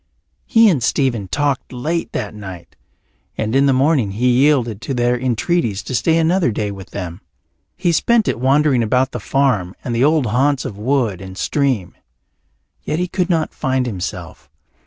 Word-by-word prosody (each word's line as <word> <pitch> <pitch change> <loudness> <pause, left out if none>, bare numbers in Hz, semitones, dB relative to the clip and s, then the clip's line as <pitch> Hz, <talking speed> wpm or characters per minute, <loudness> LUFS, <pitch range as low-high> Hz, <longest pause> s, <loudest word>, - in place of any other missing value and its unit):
He 225 0 +5
and 160 -11 +2
Stephen 120 -5 0
talked 145 +3 -1
late 155 +7 -3
that 105 - -4
night, 95 -5 -10 0.6
and 110 +2 -1
in 140 +1 +4
the - - +4
morning 130 -6 +2
he 125 +5 +1
yielded 125 -4 +2
to 135 - -3
their 120 0 +2
entreaties 120 - -1
to - - -6
stay 160 +6 +2
another 165 -3 +2
day 105 -1 -2
with 95 -1 -10
them. 90 -2 -6 0.6
He 175 -2 +1
spent 225 +6 +2
it 115 - -1
wandering 135 0 +3
about 125 +4 +1
the - - -5
farm 125 -10 0
and 120 - -3
the 120 - +2
old 150 -1 +3
haunts 130 +5 +1
of 100 - -5
wood 110 -4 -1
and 95 0 -9
stream. 130 - -1 0.9
Yet 155 - -3
he 180 +1 -1
could 180 0 -1
not 165 -3 0
find 130 -1 -1
himself. 95 -8 -6
130 Hz, 175 wpm, -18 LUFS, 105-145 Hz, 0.9 s, He